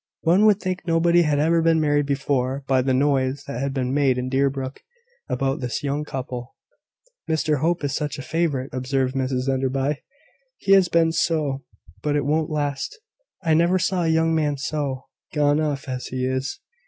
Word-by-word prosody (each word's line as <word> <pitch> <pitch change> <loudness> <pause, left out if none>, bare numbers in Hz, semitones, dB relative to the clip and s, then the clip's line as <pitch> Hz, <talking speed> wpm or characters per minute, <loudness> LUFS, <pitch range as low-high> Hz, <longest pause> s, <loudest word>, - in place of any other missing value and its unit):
One 185 +6 +4
would 210 -2 +4
think 185 -2 -3
nobody 170 +1 +4
had 150 -3 +2
ever 165 +3 +3
been 165 0 +3
married 145 -2 +2
before, 140 -1 -1
by 130 -1 +2
the 130 +1 0
noise 135 0 +1
that 140 -4 -5
had 140 0 -1
been 130 -1 -2
made 135 -3 +2
in 125 0 -2
Deerbrook 135 0 -1 0.5
about 135 +2 0
this 125 +2 -3
young 145 +1 -1
couple. 125 -3 -6 0.7
"Mr 155 -2 +1
Hope 170 +2 0
is 140 -1 -1
such 145 0 -2
a 135 - -6
favourite!" 155 -4 -1
observed 130 0 -1
Mrs 130 -1 -1
Enderby. 135 +2 0 0.6
"He 195 - -1
has 195 -2 +7
been 165 -1 +3
so; 150 -5 0 0.4
but 150 -1 0
it 145 - 0
won't 155 +2 +1
last. 145 - -2 0.4
I 160 -2 +2
never 170 +3 +4
saw 185 0 0
a 165 - +1
young 160 0 +2
man 150 -3 +1
so 140 -2 -3 0.3
gone 145 0 +3
off 145 -3 -2
as 130 -1 -4
he 130 0 -2
is. 130 +1 -2
145 Hz, 180 wpm, -23 LUFS, 135-160 Hz, 0.7 s, has